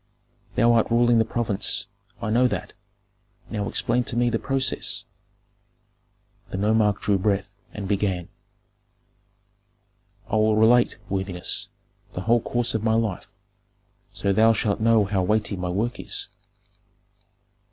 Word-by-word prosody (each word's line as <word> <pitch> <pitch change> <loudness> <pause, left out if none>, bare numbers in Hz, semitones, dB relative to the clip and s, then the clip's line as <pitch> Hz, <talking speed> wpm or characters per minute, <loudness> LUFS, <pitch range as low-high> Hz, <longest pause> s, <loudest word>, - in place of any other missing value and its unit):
Thou 120 0 +4
art 115 -1 +2
ruling 120 0 +4
the 110 - +3
province 110 -4 0 0.4
I 110 - -1
know 125 +3 +4
that. - - -4 0.8
Now 105 -2 -2
explain 125 +1 0
to - - -4
me 120 0 +2
the 115 - 0
process." 135 -1 -1 1.4
The - - -5
nomarch 105 0 +2
drew 100 -2 +1
breath 100 0 -1 0.2
and 100 -2 -6
began, 95 -3 -1 2.0
"I 110 0 0
will 110 0 +3
relate, 120 +3 +4
worthiness, 95 -2 -1 0.5
the 90 - -4
whole 115 +3 +2
course 120 +1 -1
of 110 -1 -2
my 110 0 +2
life, 110 -5 -2 0.8
so 100 - -1
thou 110 +3 +5
shalt 105 -1 -1
know 110 -1 +4
how 95 -1 0
weighty 105 +2 0
my 90 -1 -4
work 110 +7 -2
is. - - -4
110 Hz, 130 wpm, -24 LUFS, 100-115 Hz, 2.0 s, thou